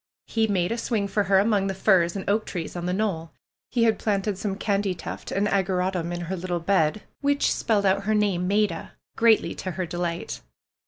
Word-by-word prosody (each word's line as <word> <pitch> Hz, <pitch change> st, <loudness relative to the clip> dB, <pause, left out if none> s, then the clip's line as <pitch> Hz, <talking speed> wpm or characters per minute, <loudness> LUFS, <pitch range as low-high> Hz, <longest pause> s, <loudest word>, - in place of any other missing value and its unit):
He 225 Hz, -1 st, +1 dB
made 185 Hz, -2 st, 0 dB
a 230 Hz, -, -1 dB
swing 215 Hz, -4 st, -1 dB
for 200 Hz, +1 st, 0 dB
her 195 Hz, +1 st, +4 dB
among 200 Hz, -1 st, +2 dB
the 195 Hz, -, -2 dB
firs 185 Hz, -3 st, +3 dB
and 195 Hz, -, -5 dB
oak 215 Hz, +2 st, +1 dB
trees 175 Hz, -3 st, -5 dB
on 175 Hz, 0 st, -3 dB
the -, -, 0 dB
knoll. 185 Hz, -5 st, -2 dB, 0.4 s
He 240 Hz, -2 st, +1 dB
had 225 Hz, -1 st, +3 dB
planted 205 Hz, -1 st, 0 dB
some 195 Hz, 0 st, -3 dB
candytuft 200 Hz, -5 st, -2 dB
and 200 Hz, +2 st, +1 dB
ageratum 185 Hz, -3 st, 0 dB
in 175 Hz, 0 st, -3 dB
her 175 Hz, +2 st, -3 dB
little 175 Hz, -1 st, -2 dB
bed, 170 Hz, +1 st, +1 dB, 0.2 s
which 285 Hz, 0 st, +2 dB
spelled 210 Hz, -3 st, +1 dB
out 195 Hz, +1 st, +2 dB
her 215 Hz, +1 st, +2 dB
name, 190 Hz, -4 st, +1 dB
^^Maida," 205 Hz, -4 st, 0 dB, 0.2 s
greatly 225 Hz, -1 st, +4 dB
to 185 Hz, -, -5 dB
her 185 Hz, 0 st, -2 dB
delight. 170 Hz, 0 st, -4 dB
195 Hz, 200 wpm, -25 LUFS, 180-210 Hz, 0.4 s, her